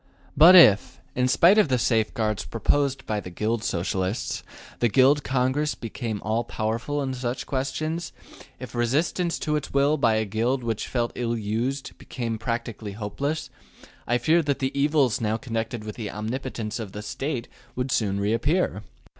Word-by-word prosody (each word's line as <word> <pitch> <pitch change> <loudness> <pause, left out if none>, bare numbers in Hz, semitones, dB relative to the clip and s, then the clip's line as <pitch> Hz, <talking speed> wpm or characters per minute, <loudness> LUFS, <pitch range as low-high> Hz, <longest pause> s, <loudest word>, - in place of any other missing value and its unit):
But 170 +5 +9
if, 105 - +6
in 125 0 +1
spite 170 +10 +5
of 210 - +4
the 130 -2 +2
safeguards 110 -2 0
proposed 135 +4 0
by 105 -1 -1
the 90 - -8
Guild 110 +5 -2
Socialists, 95 +3 -2 0.4
the 120 - +3
Guild 135 +5 +4
Congress 130 +3 0
became 115 -2 -5
all 110 +3 0
powerful 120 +8 -2
in 130 -1 -2
such 125 0 -3
questions, 155 +5 -3 0.5
if 125 -2 -8
resistance 150 +8 0
to 150 -1 -1
its 150 - -3
will 140 +2 +3
by 115 -5 +3
a 110 0 +1
Guild 115 +5 -1
which 115 -2 -2
felt 120 -2 -1
ill 120 -1 -2
used 115 +6 -3
became 115 -3 -4
practically 115 -3 -4
hopeless, 140 +10 -3 0.6
I 120 - +2
fear 160 +7 +3
that 145 -3 -1
the 135 -1 -1
evils 140 -4 +2
now 110 0 0
connected 115 -2 -4
with 105 -1 -7
the 110 -3 -4
omnipotence 115 0 -4
of 105 -4 -6
the 105 - -6
State 130 +3 -4 0.3
would 125 +1 -2
soon 100 -4 0
reappear. 115 - 0
120 Hz, 165 wpm, -25 LUFS, 110-140 Hz, 0.6 s, But